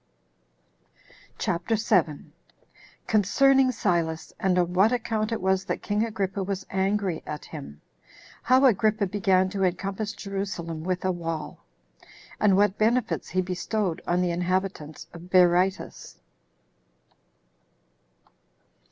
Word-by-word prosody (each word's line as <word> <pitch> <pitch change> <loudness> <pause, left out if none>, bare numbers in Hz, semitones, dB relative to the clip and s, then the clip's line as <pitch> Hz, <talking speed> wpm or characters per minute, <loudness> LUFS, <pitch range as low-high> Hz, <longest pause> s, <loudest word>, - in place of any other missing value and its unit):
CHAPTER 180 +5 -1
7. 165 -8 0 0.7
Concerning 260 +6 +4
Silas 170 -8 -1
And 185 -1 +1
On 175 0 +1
What 195 +5 +4
Account 225 -3 -1
It 225 - -1
Was 190 0 +1
That - - -3
King 210 +1 0
Agrippa 200 -3 -2
Was 195 0 -3
Angry 190 -2 0
At 150 0 -6
Him. 135 - -10 0.6
How 260 +2 +4
Agrippa 215 -3 +3
Began 190 -1 +2
To 195 -1 -1
Encompass 195 +3 -2
Jerusalem 190 -5 -5
With 185 +1 -2
A 185 - +2
Wall; 165 -3 -5 0.8
And 200 -3 +4
What 205 0 +2
Benefits 230 +2 +1
He 185 0 0
Bestowed 185 0 -2
On 175 +1 +2
The 175 - 0
Inhabitants 180 -3 -2
Of 170 +1 -11
Berytus. 180 +1 +2
190 Hz, 115 wpm, -26 LUFS, 175-210 Hz, 0.8 s, Concerning